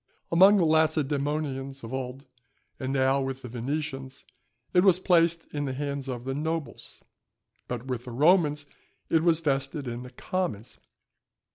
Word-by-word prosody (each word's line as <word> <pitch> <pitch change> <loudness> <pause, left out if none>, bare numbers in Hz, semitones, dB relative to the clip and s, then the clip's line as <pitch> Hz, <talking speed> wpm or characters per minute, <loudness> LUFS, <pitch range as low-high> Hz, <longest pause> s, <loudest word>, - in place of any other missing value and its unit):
Among 190 +5 +7
the 185 - +3
Lacedæmonians 145 -3 0
of 115 +3 -7
old, 130 +1 -5 0.5
as 130 - -3
now 135 0 +2
with 135 0 -4
the - - -6
Venetians, 135 +2 -4 0.5
it 180 - +5
was 190 -3 +6
placed 170 -3 +3
in 145 -1 -2
the 135 - -2
hands 140 0 -4
of 120 -2 -4
the 135 +1 -3
nobles, 155 -2 -4 0.6
but 125 0 -4
with 125 -2 -4
the 125 - -7
Romans 150 +2 +3 0.5
it 160 - +4
was 165 -1 +3
vested 135 -1 -1
in 120 0 -4
the 125 - -9
commons. 125 - -4
140 Hz, 150 wpm, -27 LUFS, 130-160 Hz, 0.6 s, Among